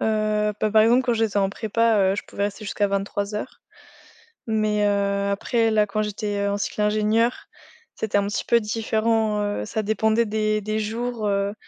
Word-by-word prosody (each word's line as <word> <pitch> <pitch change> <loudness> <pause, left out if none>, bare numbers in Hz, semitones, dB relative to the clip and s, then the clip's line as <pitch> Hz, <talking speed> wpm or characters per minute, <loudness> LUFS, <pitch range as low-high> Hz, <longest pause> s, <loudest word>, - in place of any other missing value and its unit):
Heu, 215 -1 +1
bah, 215 - +1
par 215 0 +5
exemple, 240 +4 +4
quand 245 -2 +1
j'étais 220 -2 0
en 195 -1 +2
prépa, 225 +2 +1 0.2
heu, - - -1
je - - -4
pouvais 200 - -4
rester 205 +1 -4
jusqu'à 205 0 0
23:00. 200 +1 -3 0.9
Mais, 215 -1 +1
heu, 200 0 +1
après 225 +3 +1
là 210 -1 +3
quand 215 +1 -1
j'étais, 205 -1 -3
heu, 200 - 0
en 200 - -1
cycle 210 - -4
ingénieur, 215 +3 +1 0.5
c'était 210 -2 0
un 200 - -1
petit 205 - -3
peu 235 - +4
différent, 220 0 0
heu, 205 - -2
ça 220 - -2
dépendait 220 +2 +1
des 215 0 0
des 215 +1 -2
jours, 225 +1 -3
heu, 200 0 0
215 Hz, 185 wpm, -23 LUFS, 205-220 Hz, 0.9 s, par